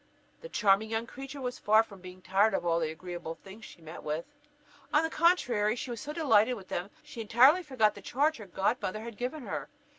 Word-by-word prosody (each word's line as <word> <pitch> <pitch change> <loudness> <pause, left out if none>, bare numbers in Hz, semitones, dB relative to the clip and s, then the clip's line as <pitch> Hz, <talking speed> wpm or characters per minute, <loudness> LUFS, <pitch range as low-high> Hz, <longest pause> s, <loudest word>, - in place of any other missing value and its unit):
The - - -9
charming 210 - +3
young 225 +1 -1
creature 270 +3 -9
was 250 0 -4
far 215 +2 +5
from 200 -4 -14
being 185 0 -11
tired 195 +2 +3
of - - -2
all 170 -1 +2
the 160 -2 -1
agreeable 170 0 -6
things 200 +4 -13
she 170 - -14
met 160 +2 -9
with. 155 +2 -3 0.7
On 300 - +4
the 320 - -1
contrary, 245 - +2
she 250 +1 -5
was 235 - -5
so 295 - -5
delighted 255 -7 +3
with 195 -4 -12
them 175 - -2
that - - -28
she 230 - -7
entirely 255 - +5
forgot 255 -10 +2
the 200 - -11
charge 290 +10 +1
her 210 -3 -10
godmother 195 +2 -1
had 230 0 -8
given 255 +6 -4
her. - - -4
220 Hz, 220 wpm, -30 LUFS, 190-255 Hz, 0.7 s, far